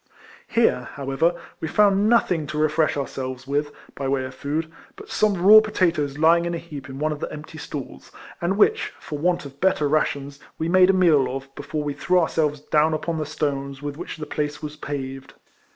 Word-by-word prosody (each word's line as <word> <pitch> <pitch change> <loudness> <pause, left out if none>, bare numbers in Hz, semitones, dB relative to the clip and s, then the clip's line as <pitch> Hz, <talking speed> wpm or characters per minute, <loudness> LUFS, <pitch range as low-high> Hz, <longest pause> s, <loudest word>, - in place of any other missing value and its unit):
Here, 225 - +2
however, 140 +5 0 0.2
we 160 - -3
found 205 +3 +3
nothing 180 -10 +2
to 155 - -5
refresh 155 0 +2
ourselves 130 -2 -4
with, 145 +2 -1 0.2
by 135 - -4
way 135 -1 0
of 130 - -8
food, 155 +4 -3 0.2
but 415 0 -12
some 215 -2 +2
raw 215 +2 +10
potatoes 170 -9 0
lying 165 +2 +4
in 170 - -2
a - - -2
heap 150 -5 -9
in 135 - -7
one 155 +2 0
of 150 - -4
the - - -4
empty 155 +1 -9
stalls, 135 - -8 0.3
and 180 +3 0
which, 440 - +3
for 150 - -6
want 175 0 0
of 140 0 -12
better 185 -5 +2
rations, 140 -1 -1 0.2
we 160 - -2
made 185 +1 +5
a - - +5
meal 165 -8 +4
of, 135 +1 -6
before 150 +2 -4
we 145 -1 -2
threv/ 180 +5 +2
ourselves 150 -3 0
down 155 +1 +2
ujion 160 +1 -2
the 155 - -3
stones 140 -2 -3
with 145 -1 -4
which 165 - -7
the 155 - -5
place 150 0 -3
was 150 0 -6
paved. 135 -3 -6
150 Hz, 200 wpm, -23 LUFS, 140-170 Hz, 0.3 s, raw